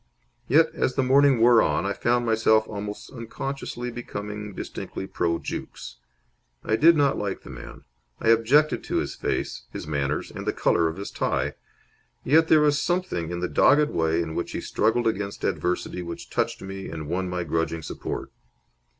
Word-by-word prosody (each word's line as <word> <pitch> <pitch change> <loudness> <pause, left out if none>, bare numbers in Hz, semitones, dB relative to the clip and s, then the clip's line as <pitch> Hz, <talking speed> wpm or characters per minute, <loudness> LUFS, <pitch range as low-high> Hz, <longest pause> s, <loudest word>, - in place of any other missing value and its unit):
Yet, 160 +5 +4
as 125 - -1
the 135 - +2
morning 135 0 +5
wore 120 0 +6
on, - - +1
I 100 - 0
found 120 +3 +1
myself 110 -1 +3
almost 105 0 -6
unconsciously 125 0 -5
becoming 105 -3 -6
distinctly - - -6
pro 85 -3 -1
Jukes. - - -7 0.7
I 110 - +1
did 165 +6 +6
not 140 -2 +2
like 100 -2 -3
the - - -10
man. - - -10 0.4
I 115 - +1
objected 125 +7 +4
to - - -3
his - - -1
face, - - -3
his - - -6
manners, 70 -1 -2
and - - -7
the - - +1
colour 85 - +2
of 80 +2 -4
his 100 - -6
tie. - - -1 0.7
Yet 160 +4 +4
there 155 -1 +6
was 150 -1 +3
something 175 - -1
in 85 0 -4
the 90 - 0
dogged 150 +10 +4
way 80 +1 +1
in 80 -1 -6
which 85 - -3
he - - -3
struggled 115 +3 +1
against 100 -2 -2
adversity 90 0 -1
which 85 -1 -8
touched 115 -3 -1
me 95 0 -6
and 80 -2 -6
won 90 +3 -2
my 90 0 -2
grudging 80 0 -2
support. - - -5
110 Hz, 175 wpm, -25 LUFS, 90-130 Hz, 0.7 s, wore